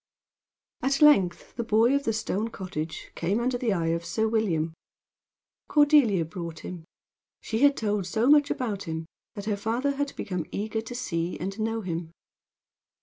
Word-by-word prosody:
At 275 +1 +1
length 195 -13 +4
the 235 - -1
boy 225 +3 +3
of 280 0 +1
the 225 - +2
stone 215 0 -1
cottage 165 -6 -6
came 190 +6 0
under 250 +1 0
the 240 -3 0
eye 170 -4 0
of 170 0 -2
Sir 220 +5 0
William. 175 -8 0 0.9
Cordelia 290 - +4
brought 165 0 -7
him. 175 -3 -8 0.6
She 220 - -2
had 285 +1 +5
told 210 -4 -1
so 220 +6 +1
much 290 0 +6
about 210 -6 -2
him 160 -1 -4 0.3
that 205 - -6
her 210 -1 0
father 240 +7 -1
had 285 0 -2
become 180 -5 -4
eager 220 +2 -2
to 230 +2 -8
see 170 -8 -2
and 195 +5 -4
know 225 +1 -1
him. 170 -3 -4
210 Hz, 165 wpm, -27 LUFS, 175-240 Hz, 0.9 s, much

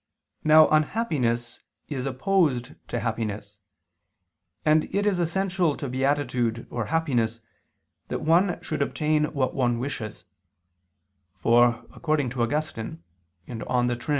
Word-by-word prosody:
Now 155 0 +7
unhappiness 145 - 0 0.3
is 135 -3 -3
opposed 135 -2 +1
to - - -3
happiness: 105 -3 -4 1.1
and 155 0 +4
it 205 +1 -1
is 200 -4 +2
essential 180 -2 0
to 140 - -4
beatitude 130 -3 0
or 120 -2 -2
happiness 120 -5 0 0.7
that - - -4
one 175 +3 +3
should 155 - -3
obtain 150 +1 +1
what 140 -4 -1
one 120 -3 +1
wishes; 120 -4 -5 1.1
for, 120 0 +3
according 155 -6 0
to 125 -2 -3
Augustine 115 - -2 0.4
(De 120 +1 -1
Trin. 120 +5 -10
135 Hz, 115 wpm, -26 LUFS, 120-155 Hz, 1.1 s, Now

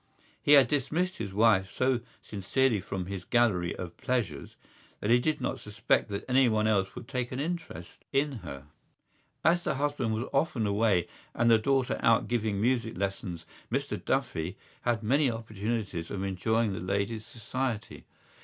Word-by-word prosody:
He 145 - +5
had 140 -4 +8
dismissed 150 +7 0
his 100 -3 -4
wife 100 -3 +3
so 130 +5 +1 0.2
sincerely 110 +3 +1
from 95 -1 -4
his 95 -1 -5
gallery 105 -8 +2
of 85 -2 -7
pleasures 120 - -2 0.4
that 105 - 0
he 120 - +6
did 155 +5 0
not - - -2
suspect 110 +2 0
that 100 -1 -4
anyone 125 -5 +3
else 100 -3 +1
would - - -8
take 125 -3 -3
an 130 - -3
interest 160 - -5
in 140 -1 +1
her. 70 -7 -8 0.8
As 170 +3 +4
the - - -1
husband 140 -5 0
was 115 +4 -3
often 135 -5 +1
away 100 -3 +2 0.3
and 115 0 +4
the 115 - +6
daughter 135 +2 +1
out 115 0 +4
giving 110 -4 0
music 115 -1 0
lessons 95 -3 -3 0.3
Mr - - -2
Duffy 80 +4 -1 0.2
had 120 -2 0
many 135 +5 +3
opportunities 110 -5 -3
of 100 -1 -3
enjoying 105 +3 0
the - - -4
lady's 100 +4 -1
society. 120 0 -4
115 Hz, 160 wpm, -29 LUFS, 100-130 Hz, 0.8 s, had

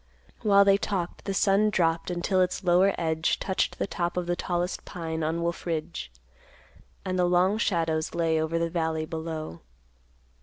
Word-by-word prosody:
While 200 -1 +5
they 195 0 +5
talked, 185 -4 -3
the 195 - -2
sun 200 +2 +3
dropped 165 -4 +1
until 180 +2 +1
its 185 +2 0
lower 185 +2 +4
edge 160 -1 0
touched 190 - -1
the - - -1
top 175 -2 -3
of 180 - 0
the 175 0 0
tallest 175 +1 -2
pine 165 -2 -5
on 160 +2 -1
Wolf 170 +1 -3
Ridge, 155 - -3 0.9
and 185 -1 -1
the 180 - +4
long 180 +4 +3
shadows 165 -7 0
lay 165 -2 +1
over 160 +1 -1
the 165 0 -1
valley 160 -2 -1
below. 160 - -5
175 Hz, 165 wpm, -27 LUFS, 160-185 Hz, 0.9 s, While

